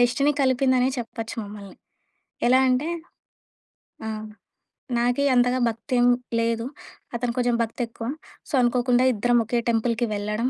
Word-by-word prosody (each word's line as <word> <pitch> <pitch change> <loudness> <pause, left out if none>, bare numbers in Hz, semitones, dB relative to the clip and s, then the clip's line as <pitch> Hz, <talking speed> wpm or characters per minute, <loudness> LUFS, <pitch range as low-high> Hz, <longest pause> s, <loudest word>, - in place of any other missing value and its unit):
Destiny 275 +4 +3
కలిపిందనే 260 -1 +3
చెప్పొచ్చు 225 -1 -5
మమ్మల్ని. 200 -2 -10 0.7
ఎలా 255 +1 +5
అంటే 255 +5 +1 1.2
ఆ! - - -2 0.9
నాకి 245 +3 +1
అంతగా 245 +1 +3
భక్తేం 245 +2 0 0.3
లేదు. 230 0 0 0.5
అతనికి 235 0 -2
కొంచెం 245 -1 +2
భక్తి 230 +3 -5
ఎక్కువ. 230 0 -7 0.4
సో - - -11
అనుకోకుండా 245 +1 +3
ఇద్దరం 240 +3 +2
ఒకే 240 +2 0
టెంపుల్‌కి 235 +1 +1
వెళ్ళడం, 210 +4 -1
245 Hz, 120 wpm, -24 LUFS, 230-250 Hz, 1.2 s, ఎలా